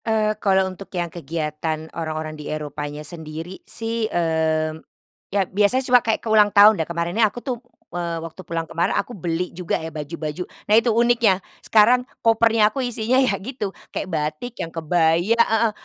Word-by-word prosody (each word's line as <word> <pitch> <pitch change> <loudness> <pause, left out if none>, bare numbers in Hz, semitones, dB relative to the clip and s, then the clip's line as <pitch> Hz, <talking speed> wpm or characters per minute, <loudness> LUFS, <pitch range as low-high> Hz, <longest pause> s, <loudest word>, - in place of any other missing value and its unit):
Eee, 215 -1 +2
kalau 190 -1 +3
untuk 190 0 -7
yang 175 -1 -2
kegiatan 155 0 -3
orang-orang 155 -1 -4
di 150 -1 -8
Eropanya 150 0 -5
sendiri 160 +2 -8
sih, 225 -1 -2
mmm, 160 -1 0 0.5
ya 195 -1 +1
biasanya 205 +8 +2
cuma 250 -1 +5
kayak 225 0 -1
ke - - -2
ulang 210 -1 +6
tahun 205 -2 +7
dan 160 - -4
kemarinnya 170 +6 +1
aku 210 - -17
tuh, 250 -4 -3 0.3
eee, 170 -1 -2
waktu 165 +2 -8
pulang 165 -2 -3
kemarin 165 +1 0
aku 245 - -2
beli 175 -1 -3
juga 175 -1 -2
ya 160 -1 -7
baju-baju 155 +2 -5 0.2
nah 210 - +1
itu 230 +2 +5
uniknya 235 -3 +3 0.2
sekarang 230 +3 +5 0.2
kopernya 225 -1 +4
aku 270 - -2
isinya 245 +1 +1
ya 230 -7 +2
gitu 210 0 -4 0.2
kayak 185 - -3
batik 155 +9 -3
yang 165 - -5
kebaya, 170 +5 +2
heeh, 225 -1 +3
180 Hz, 170 wpm, -22 LUFS, 160-220 Hz, 0.5 s, tahun